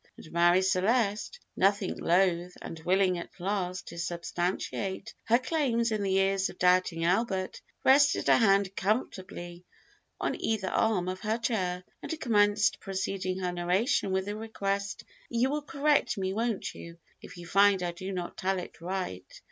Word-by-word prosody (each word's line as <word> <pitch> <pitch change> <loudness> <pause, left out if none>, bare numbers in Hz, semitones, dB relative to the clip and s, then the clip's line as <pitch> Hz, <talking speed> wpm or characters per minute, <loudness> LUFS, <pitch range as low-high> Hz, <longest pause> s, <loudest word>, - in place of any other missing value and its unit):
And 155 - -13
Marie 175 +2 +4
Celeste, 210 - +1 0.2
nothing 195 0 +2
loath, 180 0 +1
and 165 - -8
willing 185 +1 +2
at 170 - -10
last 185 -1 -2
to 170 - -8
substantiate 180 +4 -3
her 230 +1 +5
claims 255 -4 0
in 215 -1 -1
the 190 -1 +1
ears 195 0 +2
of - - -11
doubting 180 -2 +2
Albert, 190 0 0 0.2
rested 280 +2 +4
a - - +7
hand 195 -3 +3
comfortably 185 -5 -3 0.6
on - - -2
either 210 -4 0
arm 200 -5 +1
of 185 0 -3
her 220 +2 -1
chair, 185 -7 -1 0.2
and 320 - -5
commenced, 210 -4 +3
preceding 190 -1 -3
her 180 -1 -2
narration 185 +5 +1
with 190 0 0
the 205 +1 -4
request, 200 -3 -3 0.3
"You 245 +3 +1
will 300 +1 -1
correct 290 -2 +1
me, 190 -1 -1
won't 225 -1 -2
you, 170 0 -10 0.2
if - - -11
you 175 - -9
find 195 +1 +4
I 175 - -1
do 185 +3 -6
not 180 -2 -5
tell 190 0 0
it 180 - -8
right?" 180 - -4
195 Hz, 160 wpm, -29 LUFS, 180-215 Hz, 0.6 s, a